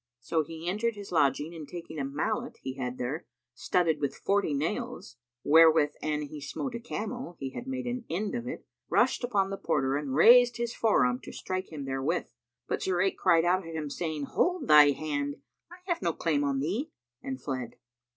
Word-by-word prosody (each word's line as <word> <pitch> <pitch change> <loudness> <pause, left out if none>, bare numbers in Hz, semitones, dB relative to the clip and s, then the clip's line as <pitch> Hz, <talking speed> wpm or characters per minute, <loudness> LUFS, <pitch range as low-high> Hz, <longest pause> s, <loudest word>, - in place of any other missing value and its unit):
So 160 +7 0
he 165 +2 -7
entered 215 +5 0
his 200 -1 -9
lodging 145 0 +2
and 160 -3 -8
taking 170 -3 -7
a - - -1
mallet 215 - -2
he 130 - -3
had 125 -1 -4
there, 140 +7 -4 0.3
studded 160 +3 +1
with 140 -2 -2
forty 200 -5 +1
nails 175 - -3 0.3
(wherewith 160 -1 +6
an 150 -1 -1
he 150 0 -8
smote 250 - -4
a 235 - -4
camel, 235 -2 -5
he 135 -1 -4
had 240 - -7
made 260 -1 -3
an 245 -1 -3
end 200 +5 -2
of 240 0 -3
it), 250 - -6 0.2
rushed - - +2
upon 200 -5 +1
the 195 - -3
porter 135 -4 +1
and 140 -3 -3
raised 240 - +7
his 235 0 -2
forearm 125 - +2
to - - -10
strike 185 -1 -4
him 145 -3 -6
therewith; 135 +5 -2 0.4
but - - -2
Zurayk 185 +1 +1
cried 170 -2 +3
out 185 +2 +2
at 165 -1 -8
him, 150 -3 -4
saying, 155 -2 -3
"Hold 360 - 0
thy 150 -1 +8
hand! 145 -1 -2 0.4
I 355 - -11
have 345 -3 -1
no 170 -2 0
claim 150 -4 0
on 140 -1 0
thee," 205 - -2 0.3
and 130 -1 -5
fled. 125 -3 -4
165 Hz, 195 wpm, -29 LUFS, 145-210 Hz, 0.4 s, thy